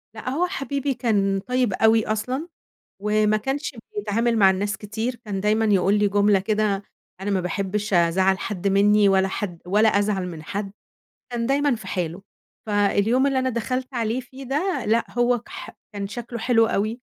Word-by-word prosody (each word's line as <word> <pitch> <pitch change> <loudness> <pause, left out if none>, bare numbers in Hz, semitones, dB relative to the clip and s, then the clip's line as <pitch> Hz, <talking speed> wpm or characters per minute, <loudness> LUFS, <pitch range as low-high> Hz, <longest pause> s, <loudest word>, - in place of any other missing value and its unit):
لأ 220 - -5
هو 325 +7 0
حبيبي 280 -5 -2
كان 200 -5 +1
طيّب 250 0 0
أوي 220 +2 +3
أصلًا، 250 +8 -2 0.6
وما 215 0 +2
كانش 270 +5 -3 0.2
بيتعامل 235 - 0
مع 195 -2 +6
الناس 195 +1 -1
كتير، 220 +5 -4
كان 195 -2 -3
دايمًا 215 +2 +2
يقول 200 -2 +3
لي 205 0 +3
جملة 205 0 +3
كده: 210 -1 0 0.4
"أنا 200 +2 -3
ما 195 -2 +1
باحبش 200 +3 -2
أزعّل 185 +3 +3
حد 200 -2 -2
مِنّي 205 +1 +4
ولا 190 0 +3
حد 185 -3 -4
ولا 210 +4 +4
أزعل 200 -2 0
من 160 -3 -8
حد." 195 +4 -5 0.6
كان 235 -1 -2
دايمًا 280 0 +2
في 215 - -9
حاله. 175 0 -3 0.4
فاليوم 210 +5 +2
اللي 270 -1 +1
أنا 260 0 0
دخلت 255 +3 -3
عليه 230 +1 -1
فيه 260 +2 -11
ده 300 +9 -1
لأ 225 +2 +2
هو 240 0 +3
كح 235 - -9 0.2
كان 200 -1 -4
شكله 235 +3 -6
حلو 225 -1 +3
أوي، 220 +2 -1
215 Hz, 170 wpm, -23 LUFS, 200-245 Hz, 0.6 s, مع